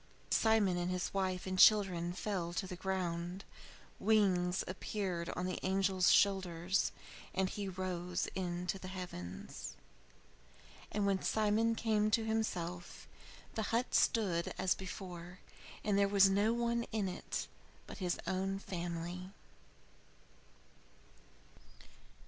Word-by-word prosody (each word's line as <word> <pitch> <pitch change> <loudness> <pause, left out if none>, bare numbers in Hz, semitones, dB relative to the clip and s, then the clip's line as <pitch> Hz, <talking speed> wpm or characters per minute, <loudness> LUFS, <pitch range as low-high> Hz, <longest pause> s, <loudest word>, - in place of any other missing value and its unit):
Simon 220 -5 +4
and 175 0 -1
his 180 0 -2
wife 185 -2 -1
and 185 0 -2
children 185 -5 +6
fell 180 -2 -3
to 190 - -1
the 185 - -6
ground. 180 0 -3 0.5
Wings 190 -4 +3
appeared 185 -2 -3
upon 180 - -3
the 185 - -3
angel's 190 -1 +3
shoulders, 190 -1 +2 0.4
and 190 0 +2
he 200 +1 -4
rose 180 -1 -2
into 180 0 -2
the 185 - -7
heavens. 175 - -7 1.2
And 205 -1 0
when 195 -1 +2
Simon 220 +1 +2
came 215 -2 +2
to 220 +1 +2
himself 180 -6 -3 0.5
the 220 - -1
hut 235 +2 0
stood 185 -8 +2
as 185 -1 +2
before, 180 -2 -7 0.5
and 205 -1 +2
there 200 - +4
was 200 -1 +6
no 205 +3 +3
one 235 0 +1
in 215 -3 0
it 180 - -3 0.4
but - - -9
his 180 -2 0
own 190 +1 -1
family. 175 -1 -5
190 Hz, 120 wpm, -35 LUFS, 180-205 Hz, 1.2 s, children